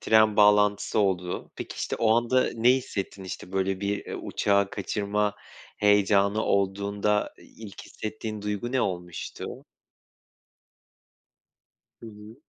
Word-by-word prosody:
tren 110 -1 +4
bağlantısı 105 0 +4
oldu. 90 -3 -1
Peki, - - -7
işte, - - -3
o 115 - +2
anda 120 +2 +2
ne 120 +2 +4
hissettin? 100 -6 -4
İşte, 90 0 -8
böyle, 95 0 -1
bir 100 0 -2 0.2
uçağı 100 -1 +1
kaçırma 105 +1 -1 0.4
heyecanı 105 0 +3
olduğunda, 100 +1 0
ilk 105 -4 -12
hissettiğin 110 -1 -6
duygu 105 +4 -3
ne 130 - +2
olmuştu? 90 -4 -4 2.6
Hı - - -11
hı. 105 +1 -12
105 Hz, 110 wpm, -26 LUFS, 100-110 Hz, 2.6 s, tren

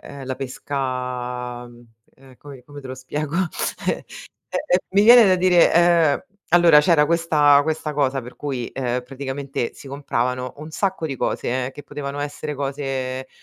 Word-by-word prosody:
ehm, 140 -1 -10
la 130 - -3
pesca 125 -2 -4
mhmm, 120 0 -16 0.3
ehm, 130 -1 -18
come 135 -3 -13
come 145 +1 -11
te 135 - -10
lo 130 - -5
spiego? 145 +4 -4 0.5
Eh - - -4 0.5
E - - -1
e 180 - +3 0.2
mi 200 - +5
viene 235 +2 +9
da 185 -1 +4
dire 180 -1 +4 0.5
uhm, 195 +1 -39 0.2
allora 170 -4 +7
c'era 150 -1 +4
questa 150 -3 +4
questa 155 0 -3
cosa 140 -2 0
per 125 +2 -11
cui, 130 -5 -5
uhm, 125 -1 -2
praticamente 135 -1 -5
si - - -13
compravano 125 -2 -2
un 155 +2 -9
sacco 190 +1 -2
di 140 - -4
cose 125 +1 -2
che 145 - -9
potevano 145 0 -6
essere 145 +1 -5
cose 135 -2 -4
140 Hz, 165 wpm, -22 LUFS, 130-150 Hz, 0.5 s, viene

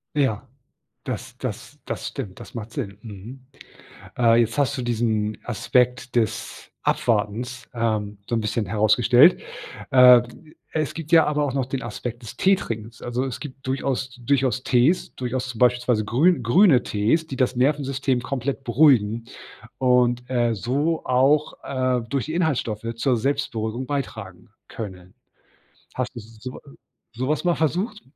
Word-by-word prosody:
Ja, 130 -8 0 0.6
das - - -6
das - - -6
das - - -4
stimmt, 95 -2 -7
das - - -11
macht 115 -1 -7
Sinn. 100 -6 -5
mhm. 115 +5 -10 0.7
Äh, 115 -2 +5
jetzt 115 -1 -1
hast 140 -1 +1
du 130 - -2
diesen 110 -3 -1
Aspekt 125 +2 0
des 115 -3 -2
Abwartens, 115 +3 -1
ähm, 110 -3 -2
so 120 - 0
'n 115 - 0
bisschen 105 +1 -1
herausgestellt. 115 - +5 0.5
Äh, 125 -2 +8 0.5
es 155 -3 -1
gibt 160 -1 -8
ja 165 -1 +7
aber 150 0 +1
auch 135 -3 -2
noch 135 -2 0
den 130 0 -4
Aspekt 120 +1 -6
des 115 - -9
Teetrinkens, 115 - -1
also, 120 +2 -2
es 130 -3 -4
gibt 135 -2 -10
durchaus 130 -1 -2
durchaus 130 -1 +1
Tees, 130 +8 +2
durchaus 130 +1 -3
zum 125 -3 -7
besipielsweise 125 -2 +2
grün 135 - +3
grüne 130 - +5
Tees, 110 +11 0
die 135 - -6
das 130 0 +1
Nervensystem 135 -1 +1
komplett 135 +1 -3
beruhigen 115 -4 +3 0.5
und, 125 -1 +2
äh, 120 -2 +1
so 140 - -1
auch, 135 +4 +2
äh, 130 -2 0
durch 135 +2 -2
die 155 - -4
Inhaltsstoffe 130 -11 -1
zur 125 +2 +1
Selbstberuhigung 120 -2 -2
beitragen 110 -10 -5 0.2
können. 95 -5 -8 0.8
Hast 125 0 -3
du - - -5
so, 115 +3 -10
äh 140 - -17 0.4
so 130 +2 -2
was 150 - 0
mal 175 -1 +3
versucht, 190 +8 -1
125 Hz, 150 wpm, -23 LUFS, 115-135 Hz, 0.8 s, Äh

